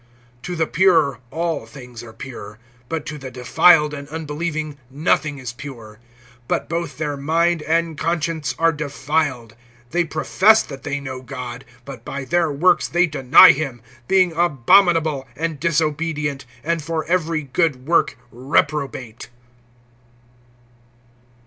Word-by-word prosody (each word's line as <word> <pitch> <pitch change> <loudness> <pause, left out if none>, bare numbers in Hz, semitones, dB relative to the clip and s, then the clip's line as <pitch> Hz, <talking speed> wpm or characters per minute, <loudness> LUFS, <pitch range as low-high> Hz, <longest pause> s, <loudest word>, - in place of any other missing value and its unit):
(15)To 175 +6 -5
the 160 - +2
pure 170 -6 +3
all 165 -7 -3
things 125 -2 -11
are 120 -2 -11
pure; 110 -4 -9 0.3
but 160 -2 -3
to 150 -2 -6
the 135 -1 -7
defiled 145 +5 +4
and 140 -1 -8
unbelieving 155 -1 -4
nothing 145 +1 0
is 125 -3 -6
pure; 115 -6 -10 0.5
but - - -1
both 170 -2 -4
their 150 -2 -2
mind 165 +4 +1
and 165 0 -1
conscience 165 -2 -2
are 165 0 +3
defiled. 145 -5 -2 0.4
(16)They 175 -1 0
profess 205 +8 +4
that 135 -2 -10
they 145 0 -3
know 130 -2 -7
God; 125 -1 -7 0.2
but 130 -4 -9
by 140 +1 -6
their 165 +3 +1
works 170 +6 +3
they 175 +1 +2
deny 155 +3 +7
him, 135 -7 -4 0.3
being 185 -2 +3
abominable, 160 -1 +3
and 160 0 -3
disobedient, 155 -3 -1 0.2
and 170 +1 -1
for 160 +1 -3
every 165 -3 0
good 140 -2 -1
work 170 -5 +2
reprobate. 135 -3 -2
150 Hz, 130 wpm, -21 LUFS, 135-165 Hz, 0.5 s, deny